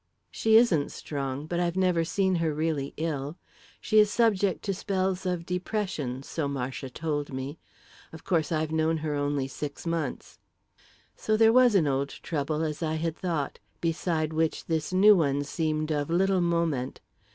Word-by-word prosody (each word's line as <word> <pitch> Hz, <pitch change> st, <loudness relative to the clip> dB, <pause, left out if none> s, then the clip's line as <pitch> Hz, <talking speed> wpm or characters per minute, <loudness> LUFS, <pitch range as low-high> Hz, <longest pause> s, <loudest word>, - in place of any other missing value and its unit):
"She 220 Hz, 0 st, +2 dB
isn't 180 Hz, -12 st, +3 dB
strong; 140 Hz, -1 st, -4 dB
but 175 Hz, +2 st, -2 dB
I've 175 Hz, 0 st, 0 dB
never 180 Hz, -3 st, +2 dB
seen 190 Hz, +2 st, +1 dB
her 165 Hz, -2 st, +1 dB
really 155 Hz, -3 st, -1 dB
ill. 150 Hz, -1 st, -3 dB, 0.4 s
She 215 Hz, -1 st, +3 dB
is 210 Hz, -1 st, +5 dB
subject 205 Hz, -4 st, +2 dB
to 200 Hz, -, -1 dB
spells 190 Hz, -1 st, -1 dB
of 175 Hz, -2 st, -2 dB
depression, 180 Hz, -, -3 dB
so 150 Hz, 0 st, -3 dB
Marcia 135 Hz, -1 st, -4 dB
told 145 Hz, +1 st, -3 dB
me. 135 Hz, +3 st, -5 dB, 0.5 s
Of 160 Hz, -, -11 dB
course, 165 Hz, -4 st, 0 dB
I've 155 Hz, -1 st, 0 dB
known 160 Hz, 0 st, +1 dB
her 150 Hz, -, -1 dB
only 145 Hz, -2 st, -1 dB
six 145 Hz, +3 st, -6 dB
months." 165 Hz, -5 st, -3 dB, 0.8 s
So 215 Hz, 0 st, 0 dB
there 225 Hz, 0 st, +6 dB
was 250 Hz, -3 st, +6 dB
an 175 Hz, -5 st, +4 dB
old 140 Hz, 0 st, 0 dB
trouble, 155 Hz, +1 st, -3 dB
as 155 Hz, 0 st, -3 dB
I 160 Hz, -1 st, -1 dB
had 160 Hz, 0 st, -2 dB
thought, 165 Hz, -7 st, -3 dB, 0.2 s
beside 165 Hz, -1 st, -1 dB
which 160 Hz, 0 st, 0 dB
this 160 Hz, -1 st, -1 dB
new 200 Hz, +3 st, +7 dB
one 145 Hz, -5 st, +1 dB
seemed 155 Hz, +1 st, -1 dB
of 145 Hz, -1 st, -1 dB
little 190 Hz, +2 st, +2 dB
moment. 170 Hz, -7 st, 0 dB
160 Hz, 165 wpm, -27 LUFS, 145-185 Hz, 0.8 s, new